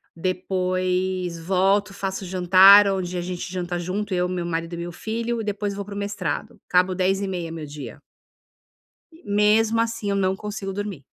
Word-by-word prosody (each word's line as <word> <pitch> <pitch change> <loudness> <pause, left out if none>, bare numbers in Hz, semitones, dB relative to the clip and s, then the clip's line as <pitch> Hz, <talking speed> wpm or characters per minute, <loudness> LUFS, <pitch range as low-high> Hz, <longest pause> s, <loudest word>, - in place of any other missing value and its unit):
Depois 185 0 -1
volto, 190 +3 +1
faço 195 -1 -4
jantar, 190 +3 +7
onde 185 -2 -2
a - - -1
gente 180 +1 -5
janta 175 -1 -3
junto, 195 +3 -3
eu, 180 0 0
meu 180 -2 -3
marido 165 0 -3
e - - -7
meu 170 0 -5
filho, 230 +3 -3
e - - -4
depois 205 -1 -2
vou 200 - -5
para 205 -1 -8
o - - -5
mestrado. 205 +2 -3
Acabo 180 +1 +3
22:30h 185 -2 -1
meu 160 -2 -6
dia. 145 -2 -9 1.3
Mesmo 215 +2 +3
assim 230 -3 -2
eu - - 0
não 190 -1 +1
consigo 205 -1 -5
dormir. 200 -8 -5
190 Hz, 165 wpm, -23 LUFS, 180-205 Hz, 1.3 s, jantar